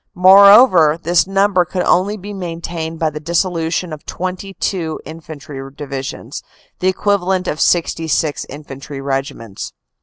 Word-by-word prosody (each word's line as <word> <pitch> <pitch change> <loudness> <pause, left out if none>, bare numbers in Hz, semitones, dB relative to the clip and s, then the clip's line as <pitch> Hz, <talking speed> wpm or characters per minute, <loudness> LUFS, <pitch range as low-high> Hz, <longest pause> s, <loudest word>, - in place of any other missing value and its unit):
Moreover, 190 -3 +7
this 170 +1 +1
number 195 -1 +2
could 180 +1 -3
only 200 +4 +2
be 205 +1 -8
maintained 170 -3 -5
by 160 -1 0
the 150 - -6
dissolution 170 0 -1
of 150 - -9
twenty 185 +2 -5
two 170 -3 -2
in 160 +1 -9
fantry 145 -3 -9
divisions, 135 -2 -6 0.4
the 185 - 0
equivalent 190 -1 0
of 155 - -2
sixty 165 -1 +1
six 155 -1 0
infantry 140 -1 -9
regiments. 135 -6 -5
170 Hz, 140 wpm, -17 LUFS, 155-185 Hz, 0.4 s, Moreover